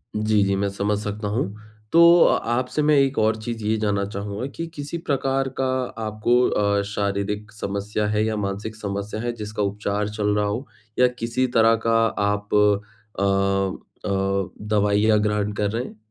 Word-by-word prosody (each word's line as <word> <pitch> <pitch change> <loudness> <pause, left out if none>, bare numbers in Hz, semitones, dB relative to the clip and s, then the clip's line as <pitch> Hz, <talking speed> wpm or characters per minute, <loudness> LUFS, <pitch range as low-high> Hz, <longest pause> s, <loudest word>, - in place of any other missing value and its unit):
जी, 105 -1 +2
जी। 100 0 +1
मैं 100 +1 0
समझ 100 +1 -1
सकता 105 0 -4
हूँ। 110 +6 0 0.5
तो, 170 - +6 0.2
अ, - - +4
आपसे 125 +5 0
मैं 150 0 +4
एक 135 0 +2
और 110 0 +3
चीज़ 115 -1 -5
ये 110 +1 +2
जानना 100 -2 0
चाहूँगा, 100 +3 -5
कि 165 +4 -6
किसी 145 +3 -5
प्रकार 135 -4 -1
का 135 - +2 0.4
आपको 110 +3 +1
अ, 100 -1 +1
शारीरिक 105 +1 -2
समस्या 105 0 -3
है 105 0 +1
या 110 0 -1
मानसिक 100 +2 -3
समस्या 100 0 -4
है, 120 +1 -1
जिसका 105 -1 -4
उपचार 100 +1 -1
चल 105 0 -2
रहा 105 0 +1
हो 110 +7 -2 0.3
या 125 - +7
किसी 115 +3 0
तरह 115 0 +6
का 115 0 +3 0.3
आप 105 0 -2 0.7
अ - - +1 0.8
अ, - - -2 0.6
दवाइयाँ 105 +1 +3
ग्रहण 105 0 0
कर 105 - +1
रहे 115 +3 -2
हैं? - - -10
105 Hz, 170 wpm, -23 LUFS, 100-115 Hz, 0.8 s, या